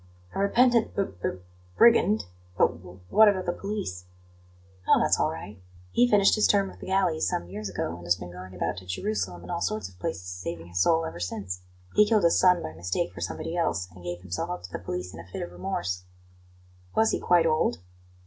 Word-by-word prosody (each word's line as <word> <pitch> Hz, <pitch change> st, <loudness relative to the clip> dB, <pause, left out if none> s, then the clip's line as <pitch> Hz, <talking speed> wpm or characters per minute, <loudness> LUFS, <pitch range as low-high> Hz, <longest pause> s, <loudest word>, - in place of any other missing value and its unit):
"A -, -, -3 dB
repentant 235 Hz, +3 st, +3 dB
b 200 Hz, -, +2 dB, 0.2 s
b -, -, +1 dB, 0.5 s
brigand? 110 Hz, -, +5 dB, 0.3 s
But 85 Hz, -, +2 dB
w 90 Hz, 0 st, -13 dB
what 220 Hz, 0 st, +7 dB
about 190 Hz, -2 st, -1 dB
the 175 Hz, -, +1 dB
police?" 140 Hz, -, -4 dB, 0.8 s
"Oh, -, -, +6 dB
that's -, -, +3 dB
all -, -, +2 dB
right! 95 Hz, +4 st, -8 dB, 0.3 s
He 245 Hz, 0 st, +4 dB
finished 205 Hz, -3 st, +5 dB
his 215 Hz, -, +4 dB
term 200 Hz, -2 st, +2 dB
of -, -, -16 dB
the -, -, -9 dB
galleys 185 Hz, -4 st, +1 dB
some 85 Hz, -, -2 dB
years 105 Hz, +1 st, -5 dB
ago, 85 Hz, -2 st, -3 dB
and 85 Hz, -, -12 dB
has 85 Hz, -, +4 dB
been 90 Hz, -1 st, -9 dB
going 90 Hz, +1 st, -10 dB
about 90 Hz, 0 st, -2 dB
to 95 Hz, 0 st, -9 dB
Jerusalem 90 Hz, -2 st, -3 dB
and 90 Hz, -, -7 dB
all -, -, -2 dB
sorts 95 Hz, +1 st, -2 dB
of 90 Hz, -1 st, -21 dB
places 90 Hz, 0 st, -3 dB
saving 85 Hz, -2 st, -6 dB
his 85 Hz, +1 st, -3 dB
soul 165 Hz, -, +3 dB
ever 125 Hz, -, -6 dB
since. 90 Hz, 0 st, -4 dB, 0.3 s
He 210 Hz, -, +7 dB
killed 215 Hz, -3 st, +3 dB
his 170 Hz, -, +4 dB
son 180 Hz, -1 st, +5 dB
by 80 Hz, -, -5 dB
mistake 85 Hz, +1 st, -2 dB
for 85 Hz, -, -9 dB
somebody 165 Hz, -, -4 dB
else, 95 Hz, -, 0 dB
and 90 Hz, 0 st, -14 dB
gave 90 Hz, 0 st, -5 dB
himself 90 Hz, -1 st, -4 dB
up 90 Hz, 0 st, -4 dB
to 90 Hz, -, -9 dB
the -, -, -4 dB
police 90 Hz, +1 st, -5 dB
in 80 Hz, -, -9 dB
a 85 Hz, -, -10 dB
fit 95 Hz, -, -5 dB
of 85 Hz, -, -7 dB
remorse." 90 Hz, 0 st, -3 dB, 0.9 s
"Was 220 Hz, 0 st, +4 dB
he -, -, 0 dB
quite 175 Hz, -2 st, +4 dB
old?" 155 Hz, -, +2 dB
95 Hz, 220 wpm, -27 LUFS, -, 0.9 s, what